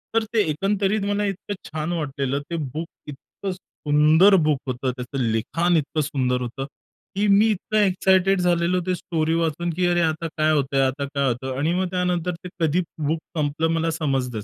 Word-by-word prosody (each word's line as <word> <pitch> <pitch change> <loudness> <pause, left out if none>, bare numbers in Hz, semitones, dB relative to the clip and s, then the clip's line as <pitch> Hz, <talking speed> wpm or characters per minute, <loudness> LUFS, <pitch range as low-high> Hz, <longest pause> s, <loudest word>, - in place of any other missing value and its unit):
तर 225 - +3
ते 220 - +4
एकंदरीत 195 +5 0
मला 205 0 0
इतकं 200 +1 -4 0.2
छान 155 +2 -3
वाटलेलं, 140 -3 -2
ते 170 - -3 0.2
बुक 160 +2 -3 0.2
इतकं 150 +7 -7
सुंदर 160 +1 +3
बुक 150 -3 +2
होतं, 130 0 -1
त्याचं 125 +2 -6
लिखाण 120 +10 +1
इतकं 155 +1 -1
सुंदर 130 -4 0
होतं 125 +2 -4 0.5
की 205 +2 +1
मी 205 +2 +5
इतकं 215 +1 -2
एक्साइटेड 190 -1 +3
झालेलो, 175 0 +2
ते 185 - +1
स्टोरी 160 -1 -1
वाचून 165 +1 -1
की 180 +1 +1
अरे! 175 0 +2
आता 160 0 0
काय 155 0 +3
होतंय? 135 -2 +1
आता 135 +2 0
काय 140 -1 -1
होतं? 130 +1 -2
आणि 155 +5 +1
मग 185 +1 0
त्यानंतर 180 -1 0
ते 180 - -6
कधी 165 +2 +2 0.3
बुक 160 +2 0 0.2
संपलं 150 +2 0
मला 165 0 0
समजलच 135 -8 -2
160 Hz, 180 wpm, -23 LUFS, 140-180 Hz, 0.5 s, मी